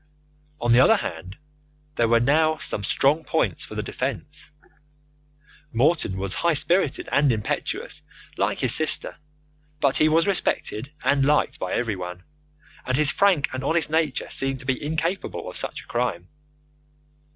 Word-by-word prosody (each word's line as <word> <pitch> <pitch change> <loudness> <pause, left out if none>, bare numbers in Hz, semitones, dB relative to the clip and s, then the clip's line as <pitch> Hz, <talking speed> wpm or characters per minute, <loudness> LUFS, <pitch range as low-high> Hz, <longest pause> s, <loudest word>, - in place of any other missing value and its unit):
On 120 - 0
the 120 - +6
other 225 +12 +6
hand, 90 - -6 0.6
there 115 - +1
were 145 +8 +3
some 100 - -2
strong 145 - +1
points 160 - 0
for 110 - -10
the 105 - -3
defence. 130 - -5 1.2
Morton 125 - +1
was 95 0 -3
high 170 -2 +1
spirited 170 0 +1
and 140 -2 +3
impetuous, 110 -3 -3 0.3
like - - -1
his - - +5
sister, - - +3 0.6
but 140 -2 +2
he 155 - +4
was 165 +1 +3
respected 140 - -1
and 140 -1 +2
liked 150 +2 +1
by 95 - -3
everyone, 90 -6 -3 0.6
and 130 0 -1
his 150 -2 +5
frank 190 -8 +2
and 130 0 -4
honest 160 +2 +1
nature 155 -4 0
seemed 135 0 0
to 130 - -12
be 130 +1 -2
incapable 160 +5 -3
of - - -8
such - - -3
a - - -23
crime. 105 -8 -2
135 Hz, 150 wpm, -23 LUFS, 115-155 Hz, 1.2 s, the